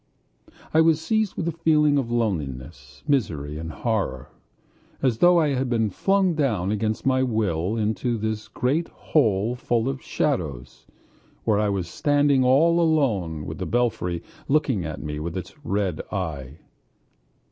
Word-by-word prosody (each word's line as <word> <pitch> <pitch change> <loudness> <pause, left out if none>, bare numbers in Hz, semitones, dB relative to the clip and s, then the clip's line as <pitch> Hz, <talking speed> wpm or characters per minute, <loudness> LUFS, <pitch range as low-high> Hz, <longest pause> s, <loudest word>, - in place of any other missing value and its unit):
I 160 - +6
was 160 -1 +4
seized 215 +4 0
with 170 - -3
a - - +1
feeling 150 -3 +3
of 125 -4 -3
loneliness, 70 - -3
misery, 75 - -1
and 80 0 -5
horror, 80 - -2 0.7
as 125 -4 0
though 175 0 +6
I 155 -2 +2
had 130 -2 -1
been 110 -3 +1
flung 195 - +2
down 110 - 0
against 110 +1 -2
my 130 -1 +3
will 105 -5 0
into 110 +2 -1
this 110 0 -3
great 150 +7 -1
hole 110 -6 +1
full 120 -1 -1
of 135 -1 -3
shadows, 75 - -3 0.6
where 105 -2 +2
I 105 -1 +1
was 95 -3 -2
standing 145 - +2
all 160 +7 +4
alone 105 - +1
with - - -6
the - - -3
belfry 110 -8 -1 0.2
looking 135 - +1
at 80 - -6
me 75 0 -4
with 85 +3 -4
its 90 - -6
red 100 - -1
eye. 75 -8 -4
110 Hz, 150 wpm, -24 LUFS, 85-145 Hz, 0.7 s, I